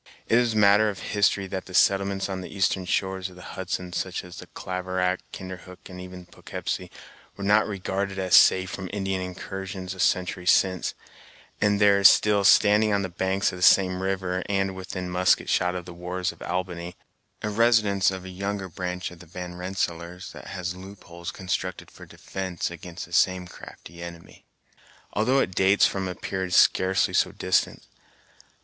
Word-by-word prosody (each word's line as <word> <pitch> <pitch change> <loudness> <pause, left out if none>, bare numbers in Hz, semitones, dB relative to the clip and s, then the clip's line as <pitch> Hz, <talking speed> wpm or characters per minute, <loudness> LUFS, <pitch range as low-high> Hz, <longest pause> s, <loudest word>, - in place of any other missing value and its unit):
It 115 - +4
is 120 -2 +1
matter 105 +1 +5
of 100 - -5 0.2
history 100 -1 +2
that 95 0 -5
the 90 - -8
settlements 95 0 +2
on 95 -1 -4
the 90 - -8
eastern 95 -1 0
shores 95 0 -1
of 90 - -15
the 90 - -12
Hudson, 90 -1 -4
such 90 +1 -3
as 90 -1 -10
Claverack, 95 0 -2
Kinderhook, 90 -1 -9
and 90 0 -9
even 90 -1 -10
Poughkeepsie, - - -5 0.5
were 100 - -6
not 105 +2 +4
regarded 100 -1 -3
as 95 -1 +3
safe 95 0 +6
from 95 -1 -6
Indian 95 -2 -2
incursions 95 0 -6
a 95 - -13
century 90 0 0
since; 95 -1 +2 0.7
and 105 -1 +3
there 100 -1 +5
is 100 - +10
still 105 -1 +3
standing 105 +2 +5
on 100 -1 +1
the 95 - -3
banks 95 +3 0
of 90 - -8
the - - -10
same 90 0 +5
river, 95 -1 -1
and 95 -1 0
within 95 -1 -5
musket 90 +1 +2
shot 90 0 +1
of 90 -1 -5
the 90 - -9
wharves 90 +1 -3
of 85 - -19
Albany, 90 -1 -4 0.5
a 105 - -1
residence 105 -3 +3
of 95 -1 -6
a - - -7
younger 100 +1 -4
branch 90 +1 -4
of 90 - -13
the 90 - -14
Van 90 +1 -7
Rensselaers, 90 -1 -4
that - - -11
has 90 -1 -4
loopholes 90 -2 -9
constructed 90 -1 -4
for - - -13
defence 95 -3 -5
against 85 0 -8
the 85 - -15
same 90 +1 +2
crafty 85 -1 -12
enemy, 85 -1 -10 0.7
although 125 +6 +2
it 115 -8 +1
dates 95 +2 +4
from 95 -1 -1
a 90 - -4
period 95 0 -3
scarcely 95 +1 +4
so - - +2
distant. 95 -1 0
95 Hz, 175 wpm, -25 LUFS, 90-100 Hz, 0.7 s, is